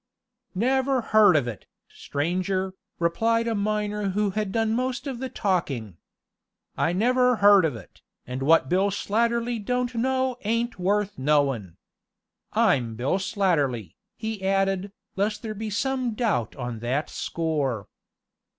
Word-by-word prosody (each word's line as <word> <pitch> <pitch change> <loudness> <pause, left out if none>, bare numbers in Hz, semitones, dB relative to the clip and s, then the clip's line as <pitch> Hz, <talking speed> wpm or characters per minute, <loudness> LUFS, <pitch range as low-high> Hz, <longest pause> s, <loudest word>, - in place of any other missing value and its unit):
"Never 260 +4 +2
heard 210 -5 +7
of 140 -5 +2
it, 110 -5 -7 0.2
stranger," 185 +5 -2 0.2
replied 225 +7 +1
a 230 - +1
miner 210 -1 -1
who 205 +1 0
had 210 0 -2
done 225 +1 +1
most 255 +2 -2
of 265 -4 -4
the 260 0 -4
talking. 135 - -2 0.8
"I 165 - +1
never 250 +6 +3
heard 205 -4 +6
of 150 -6 -1
it, 105 -5 -13 0.2
and 125 +1 -5
what 150 0 +4
Bill 190 +6 +2
Slatterly 235 +4 0
don't 250 +3 -1
know 260 +1 0
ain't 230 +1 -1
worth 200 -1 0
knowin'. 135 - +1 0.7
I'm 120 -5 +2
Bill 130 - 0
Slatterly," 150 - 0 0.2
he 220 -2 -5
added, 195 0 +1 0.2
lest 210 +3 -1
there 220 -1 -4
be 215 +1 -5
some 255 +2 -1
doubt 210 - 0
on 120 -3 -5
that 130 +6 -1
score. 145 - -2
200 Hz, 135 wpm, -25 LUFS, 150-230 Hz, 0.8 s, heard